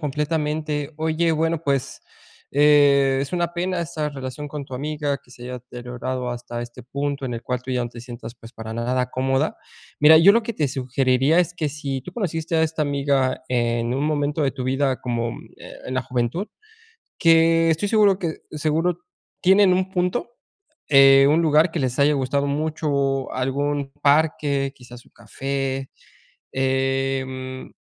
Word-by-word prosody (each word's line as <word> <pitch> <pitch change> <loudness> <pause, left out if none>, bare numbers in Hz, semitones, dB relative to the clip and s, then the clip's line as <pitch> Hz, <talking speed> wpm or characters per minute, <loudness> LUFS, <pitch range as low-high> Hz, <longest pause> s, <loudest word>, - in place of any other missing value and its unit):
completamente. 150 0 -2
Oye, 160 +1 +1
bueno, 160 0 0
pues, 140 -2 -1 0.5
eh, 140 -2 +4
es 140 - -3
una 175 -1 -1
pena 180 +1 -2
esta 155 -2 -3
relación 140 +1 -6
con 145 -1 -6
tu 135 - -16
amiga, 145 0 -2
que - - -24
se 120 - -13
haya 125 +1 -6
deteriorado 125 +1 -5
hasta 120 0 -5
este 120 0 -10
punto 140 +2 -3
en 120 - -4
el 115 - -6
cual 125 -1 -3
tú 130 - -7
ya 125 -1 0
no 120 - -6
te 120 - -10
sientas, 120 -1 -9
pues, 115 0 -15
para 110 0 -7
nada 125 +2 -1
cómoda. 135 +3 0 0.4
Mira, 155 +2 +8
yo 180 +6 +7
lo 235 - +3
que 230 0 -5
te 150 - 0
sugeriría 130 +3 +1
es 175 -1 -1
que 155 -3 -2
si 140 -2 -4
tú 180 +8 -10
conociste 165 -6 -2
a 160 - +3
esta 160 0 -1
amiga 140 -3 0
en 120 -1 0
un 135 +3 -1
momento 150 0 -1
de 140 - +2
tu 130 -2 -6
vida 135 0 0
como, 120 -2 -2
mm, - - -10
eh, - - -10
la 130 - 0
juventud 125 - -2 0.7
que 165 0 +4
estoy 165 +6 0
seguro 205 -3 +4
que 170 -4 -3
seguro 160 +3 0 0.4
tienen 190 +1 +5
un 185 +1 -1
punto, 180 +6 -1 0.6
eh, 135 -1 +7
un 155 +3 +3
lugar 155 +2 +4
que 165 - -2
les 130 0 -2
haya 145 +1 +4
gustado 140 +1 0
mucho 140 -2 -1
algún 140 +2 -1
parque, 145 -2 +2
quizás 125 -1 -13
un - - -24
café, 135 -1 -4 0.6
eh, 135 0 0 0.4
mm, - - -18
140 Hz, 170 wpm, -22 LUFS, 130-155 Hz, 0.7 s, Mira